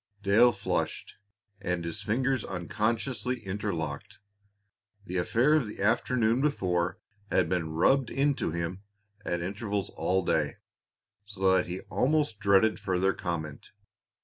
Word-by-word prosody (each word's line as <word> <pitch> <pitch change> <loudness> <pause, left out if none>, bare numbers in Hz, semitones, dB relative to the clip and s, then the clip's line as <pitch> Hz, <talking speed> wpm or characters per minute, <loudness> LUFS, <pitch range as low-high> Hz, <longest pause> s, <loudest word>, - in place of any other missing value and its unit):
Dale 110 +5 +6
flushed, 100 -4 -3 0.5
and 90 -4 -2
his 85 +4 -4
fingers 125 +5 0
unconsciously 115 +7 -2
interlocked. 95 -7 -4 0.9
The 90 -2 -3
affair 120 +11 +3
of 150 -7 +3
the 105 - -9
afternoon 115 +2 +2
before 90 -12 0 0.3
had 90 - +2
been 85 -2 -1
"rubbed 120 - +3
into 140 -5 +1
him" 85 +3 -3 0.4
at 85 -3 -2
intervals 100 +1 -3
all 95 -1 0
day, - - +1 0.7
so 95 -2 0
that 95 - +3
he 90 +2 -5
almost 145 -6 0
dreaded 100 0 +3
further 95 -1 +1
comment. 80 -4 -5
100 Hz, 120 wpm, -29 LUFS, 90-120 Hz, 0.9 s, Dale